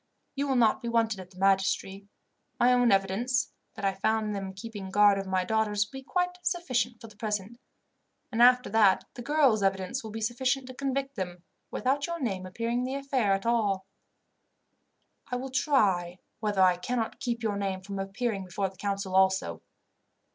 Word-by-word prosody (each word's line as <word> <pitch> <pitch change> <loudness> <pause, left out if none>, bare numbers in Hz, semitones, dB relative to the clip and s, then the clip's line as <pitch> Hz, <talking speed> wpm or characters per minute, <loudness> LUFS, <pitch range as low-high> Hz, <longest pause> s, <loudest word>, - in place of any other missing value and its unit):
You 280 0 -2
will 270 - +1
not 235 0 +3
be 235 - -5
wanted 225 -3 +1
at 185 -1 -9
the 185 - -19
magistracy. 195 +1 +1 0.5
My 250 +1 +5
own 245 -2 +4
evidence, 200 +7 +1 0.2
that - - -4
I 195 - +2
found 215 +2 0
them 195 -1 -4
keeping 195 0 -8
guard 205 0 +5
over 195 -1 -5
my 185 -1 +1
daughters, 210 -1 +1
will 265 +5 -9
be - - -13
quite 360 +4 -1
sufficient 255 -10 -1
for - - -11
the 215 -2 -13
present, 210 +1 -3 0.7
and 230 0 0
after 250 +1 +6
that 210 -3 +4
the 245 - -8
girls' 270 -5 +3
evidence 195 +5 -1
will 220 - -6
be 220 +1 -5
sufficient 250 +4 0
to - - -7
convict 275 0 -3
them, 180 -2 -5 0.3
without 280 +4 0
your 340 0 -4
name 195 -9 -2
appearing 230 +5 -2
in 250 - -1
the 260 +1 -3
affair 270 -7 +1
at 195 +2 -2
all. 205 -5 +1 1.4
"I 250 - -3
will 260 +1 -4
try 200 - +2 0.2
whether 205 -3 +2
I 180 -1 +4
cannot 225 +5 -3
keep 240 -4 -3
your 215 -2 0
name 195 -2 -2
from 195 +1 -6
appearing 195 +1 -2
before 190 +2 -2
the 190 - -20
council 200 -1 -3
also. 190 - +2
215 Hz, 185 wpm, -28 LUFS, 195-250 Hz, 1.4 s, after